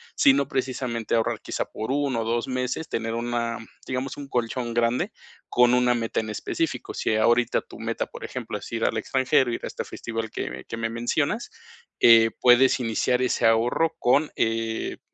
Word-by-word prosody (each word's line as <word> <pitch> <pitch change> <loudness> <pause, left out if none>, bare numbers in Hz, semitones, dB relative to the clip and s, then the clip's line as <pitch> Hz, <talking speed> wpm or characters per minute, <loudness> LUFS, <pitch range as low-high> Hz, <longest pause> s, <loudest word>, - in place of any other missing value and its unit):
sino 265 - +4
precisamente 125 -4 -2
ahorrar 115 - 0
quizá - - -3
por 110 +4 -5
1 135 -4 0
o - - -1
2 115 +2 -1
meses, 130 +5 -2
tener 115 0 -2
una, 115 0 -2 0.3
digamos, 130 +1 -3
un 145 -1 -7
colchón 120 -1 -2
grande 115 +1 +1 0.4
con 125 0 +5
una 125 0 +4
meta 115 -1 -1
en 110 - -7
específico. 110 - -3
Si 110 - 0
ahorita 120 +2 +3
tu - - -14
meta, - - -2
por - - -11
ejemplo, - - -5
es - - -10
ir 115 -1 -1
al 110 - +1
extranjero, 130 +2 +2
ir 115 - -3
a - - -3
este - - -5
festival 115 -1 -5
que 65 +1 -5
que 115 - -4
me 115 0 -2
mencionas, 115 +1 -1 0.5
eh, 115 -1 +7
puedes 125 +2 +5
iniciar 125 +1 0
ese 125 -2 +1
ahorro 120 +8 +2
con, 140 +5 +3
eh, 115 0 -1
120 Hz, 180 wpm, -25 LUFS, 115-125 Hz, 0.5 s, eh